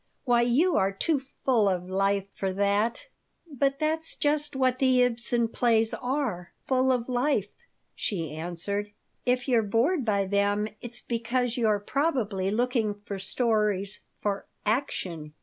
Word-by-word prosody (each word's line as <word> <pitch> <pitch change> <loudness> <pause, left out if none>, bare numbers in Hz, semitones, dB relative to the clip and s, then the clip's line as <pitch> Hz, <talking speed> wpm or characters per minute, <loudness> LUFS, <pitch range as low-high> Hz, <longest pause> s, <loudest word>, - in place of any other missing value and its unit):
"Why, 240 -2 +3
you 270 +10 +3
are 195 -1 +2
too 280 +8 0 0.2
full 230 -6 +4
of 180 -1 -2
life 195 +1 +1
for 195 -1 -2
that." 205 - +1 0.4
"But 275 -2 0
that's 320 +2 -1
just 295 -1 0
what 255 -1 +1
the 255 -2 +4
Ibsen 235 -1 +1
plays 225 -2 +2
are 245 -9 -2
full 260 0 +2
of 245 -2 0
life," 250 -4 +1 0.4
she 165 -8 -3
answered. 195 +5 -3 0.3
"If 250 +1 +1
you're 240 -3 +4
bored 240 - +1
by 200 -3 +1
them 205 +2 +1
it's 240 0 -6
because 240 +1 -1
you're 220 -4 +2
probably 220 - 0
looking 225 -1 0
for 200 -1 -5
stories, 210 -1 0 0.2
for 200 -1 -2 0.2
'action.' 180 - -2
230 Hz, 140 wpm, -27 LUFS, 200-255 Hz, 0.4 s, full